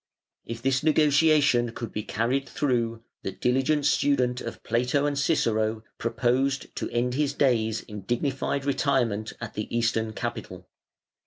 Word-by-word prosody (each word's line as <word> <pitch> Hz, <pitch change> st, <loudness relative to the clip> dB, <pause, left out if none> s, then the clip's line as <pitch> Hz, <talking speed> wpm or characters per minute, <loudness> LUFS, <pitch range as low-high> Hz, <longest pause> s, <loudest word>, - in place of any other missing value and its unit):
If 115 Hz, 0 st, -6 dB
this 135 Hz, 0 st, +2 dB
negotiation 150 Hz, -5 st, +4 dB
could 115 Hz, -2 st, -6 dB
be 105 Hz, -, -3 dB
carried 120 Hz, +6 st, -1 dB
through, 115 Hz, -5 st, -1 dB, 0.2 s
the 95 Hz, -, -4 dB
diligent 135 Hz, +8 st, +1 dB
student 125 Hz, -4 st, +2 dB
of -, -, -7 dB
Plato 125 Hz, +5 st, +1 dB
and 145 Hz, -1 st, 0 dB
Cicero 115 Hz, -7 st, +1 dB, 0.2 s
proposed 130 Hz, +4 st, 0 dB
to -, -, -2 dB
end 125 Hz, +1 st, 0 dB
his 140 Hz, +1 st, 0 dB
days 115 Hz, -6 st, +2 dB
in 105 Hz, -1 st, -9 dB
dignified 135 Hz, +5 st, -1 dB
retirement 125 Hz, -6 st, 0 dB
at 120 Hz, -3 st, -6 dB
the 105 Hz, -, -4 dB
Eastern 115 Hz, -2 st, 0 dB
capital. 105 Hz, -6 st, -6 dB
125 Hz, 140 wpm, -26 LUFS, 115-140 Hz, 0.2 s, negotiation